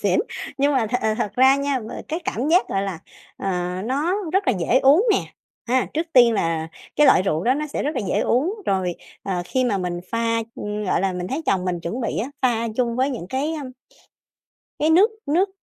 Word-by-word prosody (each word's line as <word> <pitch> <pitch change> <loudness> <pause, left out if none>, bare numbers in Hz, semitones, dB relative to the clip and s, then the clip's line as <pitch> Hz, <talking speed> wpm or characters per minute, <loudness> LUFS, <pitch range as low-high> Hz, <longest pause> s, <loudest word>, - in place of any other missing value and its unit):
xỉn. - - +3 0.4
Nhưng 285 +1 +3
mà 245 -5 +2
th 235 - -6 0.2
thật 205 - -1
ra 265 +2 +6
nha, 280 -1 0
m 220 - -8 0.2
cái 320 +3 -2
cảm 255 +7 -2
giác, 355 +3 +3
gọi 195 - -1
là, 195 -4 -4 0.4
ờ, 195 - -4 0.4
nó 285 +9 0 0.2
rất 385 +2 +1
là - - +5
dễ 230 +9 +3
uống 300 - +5
nè, - - +3 0.5
ha, 255 0 +2
trước 320 +2 -1
tiên 240 -2 +7
là 165 -4 -1 0.3
cái 295 - +6
loại 190 - +6
rượu 170 -3 -1
đó 255 +2 +3
nó 300 +1 -2
sẽ 285 - -3
rất 295 - 0
là - - +1
dễ - - +1
uống. 300 - +1
Rồi, 185 -2 0 0.3
ờ, 180 -3 -2
khi 255 +8 0
mà 210 -6 +1
mình 175 -1 -3
pha 230 0 0 0.2
ưm, 210 0 -4
gọi 185 - +1
là, 195 0 0
mình 180 0 -4
thấy 290 +5 -3
chồng 185 -2 +1
mình 180 -2 -2
chuẩn 180 +10 -4
bị 235 - -2
á, 250 +6 -3
pha 230 -2 +1
chung 235 -2 0
với 265 +2 +1
những 230 -9 -5
cái, 290 +5 -1
ưm 255 -1 -8 1.1
cái 310 +2 +2
nước 380 +8 +6 0.2
nước 350 +7 +2
250 Hz, 225 wpm, -22 LUFS, 195-285 Hz, 1.1 s, tiên